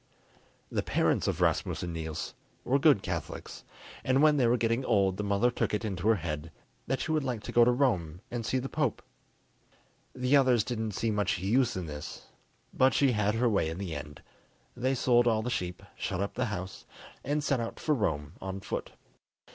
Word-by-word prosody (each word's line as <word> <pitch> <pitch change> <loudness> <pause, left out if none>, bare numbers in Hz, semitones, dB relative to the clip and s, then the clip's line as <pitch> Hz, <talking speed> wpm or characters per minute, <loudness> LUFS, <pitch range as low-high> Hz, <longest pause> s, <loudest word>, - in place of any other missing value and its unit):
The - - 0
parents - - +1
of - - -1
Rasmus - - +1
and 85 -1 -4
Niels 80 -1 -4 0.3
were 135 +3 +2
good 140 -9 +5
Catholics, 85 -4 -5 0.4
and 130 +3 +3
when 150 -1 +5
they 125 -4 +4
were 120 +1 +3
getting 115 +2 +1
old 95 -5 +2
the 105 - -2
mother 100 +4 +2
took 110 - 0
it 110 - -3
into 95 -2 -2
her 115 - +6
head 80 -3 -4 0.4
that - - -1
she - - -2
would 155 -2 +1
like 125 -5 -3
to - - -5
go 120 - +6
to 120 - +5
Rome 95 - +1
and 120 -1 -3
see 130 - 0
the 130 +1 -2
Pope. 150 -5 -1 1.1
The 125 +2 +2
others 130 -5 +4
didn't 110 -3 -3
see 115 +1 0
much 105 -2 0
use 120 +7 +2
in 90 - -3
this, 75 -1 -7 0.5
but 130 +1 +4
she 140 -2 +4
had 105 -1 +1
her 120 +2 +2
way 100 -8 +2
in 80 - -5
the 95 -4 -4
end: 75 0 -8 0.5
they 130 +2 0
sold 120 -1 +3
all 110 -2 +2
the 125 - -2
sheep, 90 -3 -3
shut 90 - -3
up 100 +1 -2
the 125 - -1
house, 95 -4 -6 0.4
and 145 +2 -1
set 140 -3 +1
out 115 -1 -4
for 155 - +1
Rome 80 - -1
on 95 0 -4
foot. - - -5
110 Hz, 205 wpm, -30 LUFS, 95-125 Hz, 1.1 s, her